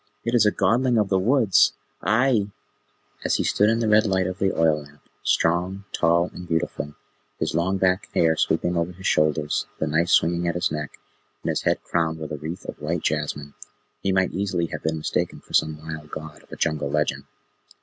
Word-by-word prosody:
It 115 - -1
is 115 -3 +5
a - - +4
Godling 125 +3 +2
of 105 -2 +1
the 95 - +3
Woods! 115 0 +4 0.3
Ahai!" 110 +1 +2 0.7
As - - +1
he - - +1
stood 105 +1 +3
in 115 +1 +1
the 115 - +1
red 110 +1 +5
light 95 -1 +1
of 95 +1 -4
the 95 0 +2
oil 80 -2 +2
lamp, 75 +1 -16 0.2
strong, 90 +4 +1
tall, 85 +1 +2
and 90 - -9
beautiful, 80 -3 -2 0.4
his - - -1
long 90 +4 +1
black 95 0 +1
hair 80 -1 +4
sweeping 90 +2 +1
over 85 +1 -1
his 95 +1 -12
shoulders, 75 -1 +1
the - - -1
knife 80 +3 +1
swinging 85 +1 +3
at 85 - 0
his 90 - 0
neck, 75 -2 -5 0.5
and - - -1
his - - 0
head - - 0
crowned 80 -1 0
with 80 -1 -7
a 75 - -3
wreath 80 +4 -6
of - - -8
white - - -2
jasmine, 75 -1 -2 0.5
he 95 - 0
might 95 -1 +2
easily 95 -3 -1
have - - -5
been 80 0 -1
mistaken 75 - -2
for - - -18
some 80 -1 +2
wild 80 -1 -8
god 80 0 -8
of - - -25
a - - -6
jungle 75 -2 0
legend. 75 +1 -1
85 Hz, 205 wpm, -24 LUFS, 80-95 Hz, 0.7 s, is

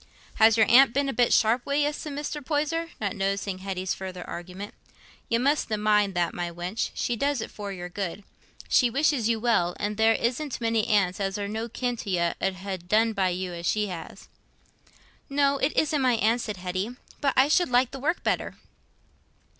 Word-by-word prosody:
"Has 220 0 +6
your 220 - +6
aunt 260 +1 +6
been 280 0 +1
a 270 - -1
bit 245 -2 +2
sharp 230 +2 +4
wi' 280 - -2
you?" 295 +1 +2
said 295 0 -6
Mr. 295 +1 -4
Poyser, 320 +3 -1
not 210 +1 -2
noticing 195 -1 -2
Hetty's 185 -1 -3
further 185 -2 -7
argument. 185 +4 -7 0.6
"You 230 - +2
mustna 265 -4 +1
mind 210 -2 +2
that, 175 -1 0
my 175 -1 -3
wench—she 180 +7 -3
does 280 +3 0
it 220 - -5
for 205 -1 -6
your 180 -2 -6
good. 195 +1 -5 0.4
She 245 - +4
wishes 270 -3 +1
you 230 -1 +1
well; 215 -7 +1
an' 205 0 -2
there 225 0 +5
isn't 255 +5 -2
many 225 -2 0
aunts 200 -4 +2
as 195 0 -1
are 200 -1 -3
no 220 +3 -4
kin 245 +1 -2
to 205 - -6
you 170 -2 +1
'ud 195 -1 0
ha' 190 +1 -5
done 215 +6 +2
by 190 -3 +1
you 180 0 -3
as 170 0 -4
she 210 -1 +1
has." 170 -3 -8 1.0
"No, 280 0 +2
it 275 - +1
isn't 300 -2 +2
my 255 -1 +3
aunt," 225 +2 +2
said 210 -4 -4
Hetty, 185 +6 -3 0.2
"but 275 -2 0
I 265 +2 +6
should 345 +1 +3
like 250 0 +3
the 270 - -7
work 320 +6 -1
better." - - -1
220 Hz, 200 wpm, -26 LUFS, 190-260 Hz, 1.0 s, Has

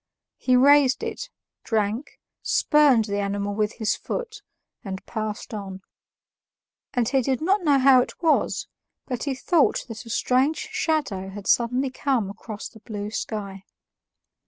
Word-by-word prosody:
He 255 - +2
raised 275 0 +5
it, - - -5 0.3
drank, 220 +3 -2 0.2
spurned 285 -7 +4
the 205 -1 -2
animal 200 0 -2
with 210 +1 0
his 220 - 0
foot, 450 -4 -5 0.4
and 190 -2 -6
passed 215 0 -5
on. 195 -2 -6 1.1
And 240 -2 +2
he 270 +1 +2
did 260 0 0
not 380 +5 +2
know 290 -5 +4
how 260 -1 +6
it - - -6
was, 325 -3 +1 0.4
but 250 -1 -4
he 275 -2 -1
thought 315 +3 +2
that 225 -1 -7
a 230 - -12
strange 275 - +1
shadow 305 - -1
had 200 0 -9
suddenly 250 +5 +2
come 255 -7 -1
across 215 0 -8
the 220 - -16
blue 210 -1 -6
sky. 200 -3 -5
240 Hz, 145 wpm, -24 LUFS, 210-280 Hz, 1.1 s, how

